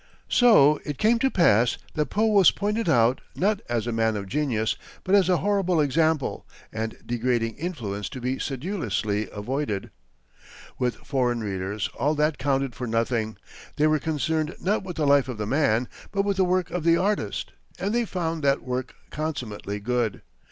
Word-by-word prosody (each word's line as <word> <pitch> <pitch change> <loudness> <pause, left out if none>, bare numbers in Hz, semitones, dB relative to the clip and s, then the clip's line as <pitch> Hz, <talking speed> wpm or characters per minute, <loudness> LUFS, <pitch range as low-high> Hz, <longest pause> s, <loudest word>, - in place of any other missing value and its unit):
So 155 - +6
it 150 -3 -5
came 230 +2 +3
to 265 +2 +2
pass 125 - +3 0.2
that 150 -1 0
Poe 215 +2 +1
was 205 -5 +6
pointed 210 0 -1
out, 120 -3 +3
not 205 +2 +1
as 120 -2 0
a 120 - -2
man 110 -1 +1
of 100 - -4
genius, 115 -3 0 0.3
but 185 - -1
as 195 -3 +5
a 180 - +4
horrible 195 -4 +1
example 155 0 +1 0.3
and 110 0 -4
degrading 120 -1 -1
influence 115 - -4
to 130 - -7
be 130 +2 -2
sedulously 130 - -2
avoided. 110 0 -3 0.9
With 125 -1 0
foreign 125 -4 -1
readers, 100 0 -3
all 150 +2 +2
this 150 +1 +2
counted 135 -2 0
for 125 +1 -5
nothing. 115 -1 -1 0.4
They 150 - +2
were 155 0 +3
concerned 155 +1 -1
not 205 +4 0
with 180 -2 -6
the 155 - 0
life 140 -2 +4
of 125 - -4
the 105 - -3
man, 125 -2 +1 0.2
but 200 -1 +1
with 200 -1 0
the 190 - +4
work 180 -1 0
of 180 -3 -2
the 165 0 +4
artist, 190 - -1 0.3
and 200 +3 -2
they 240 0 +1
found 165 -5 -3
that 140 0 +2
work 125 0 -4 0.2
consummately 120 -10 -4
good. 115 -1 -1
140 Hz, 175 wpm, -25 LUFS, 115-175 Hz, 0.9 s, So